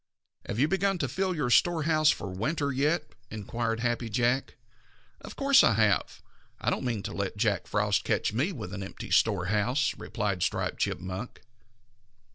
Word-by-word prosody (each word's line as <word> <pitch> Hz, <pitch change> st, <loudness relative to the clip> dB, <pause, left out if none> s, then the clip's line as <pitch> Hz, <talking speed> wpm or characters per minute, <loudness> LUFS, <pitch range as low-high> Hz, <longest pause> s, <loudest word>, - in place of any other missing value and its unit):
"Have 100 Hz, -, -3 dB
you 140 Hz, +5 st, +3 dB
begun 195 Hz, +2 st, +1 dB
to 140 Hz, -, -1 dB
fill 185 Hz, +8 st, -1 dB
your 135 Hz, -6 st, -1 dB
storehouse 155 Hz, -1 st, +4 dB
for 100 Hz, -, -1 dB
winter 140 Hz, -, -1 dB
yet?" 145 Hz, +6 st, 0 dB, 0.2 s
inquired 115 Hz, +2 st, -3 dB
Happy 120 Hz, -1 st, -1 dB
Jack. 120 Hz, +4 st, 0 dB, 0.7 s
"Of -, -, -9 dB
course 275 Hz, -1 st, +5 dB
I -, -, +5 dB
have. 110 Hz, -1 st, +1 dB, 0.4 s
I -, -, 0 dB
don't -, -, -1 dB
mean 115 Hz, -5 st, -2 dB
to -, -, -5 dB
let 100 Hz, +1 st, -3 dB
Jack 105 Hz, -2 st, 0 dB
Frost 105 Hz, -1 st, +1 dB
catch -, -, 0 dB
me 140 Hz, -, 0 dB
with 95 Hz, -, -7 dB
an 100 Hz, -, -5 dB
empty 95 Hz, -, -8 dB
storehouse," 105 Hz, +7 st, +2 dB
replied 100 Hz, -4 st, -2 dB
Striped -, -, -1 dB
Chipmunk. 95 Hz, +6 st, -4 dB
120 Hz, 160 wpm, -28 LUFS, 105-150 Hz, 0.7 s, course